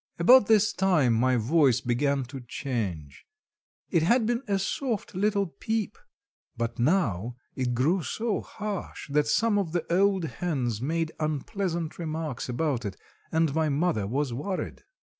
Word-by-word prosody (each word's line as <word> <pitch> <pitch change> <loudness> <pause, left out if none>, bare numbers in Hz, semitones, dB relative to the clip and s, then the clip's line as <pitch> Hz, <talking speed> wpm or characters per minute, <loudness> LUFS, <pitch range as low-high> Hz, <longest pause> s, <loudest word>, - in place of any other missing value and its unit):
About 225 +6 +7
this 215 -1 +4
time, 175 -11 +3
my 125 +3 +3
voice 130 +1 +3
began 135 +2 0
to 130 +2 -8
change. 110 - -4 0.7
It 170 - +3
had 230 +8 +3
been 240 +2 0
a 200 -1 +1
soft 220 +3 -2
little 200 +1 +1
"peep," 220 - -3 0.6
but 115 0 -3
now 120 - +1 0.2
it 125 -2 -1
grew 160 +10 +2
so 220 +7 -2
harsh, 210 -3 -6
that 150 +1 +2
some 215 +6 +2
of 170 -5 -3
the 170 -2 -1
old 195 0 +3
hens 135 - -2
made 160 +3 -1
unpleasant 165 +2 -2
remarks 155 -6 -4
about 130 -1 -1
it, 100 -3 -5 0.3
and 160 -3 +2
my 160 0 +1
mother 145 - 0
was 135 +3 -1
worried. 180 +10 -4
155 Hz, 145 wpm, -27 LUFS, 125-195 Hz, 0.7 s, About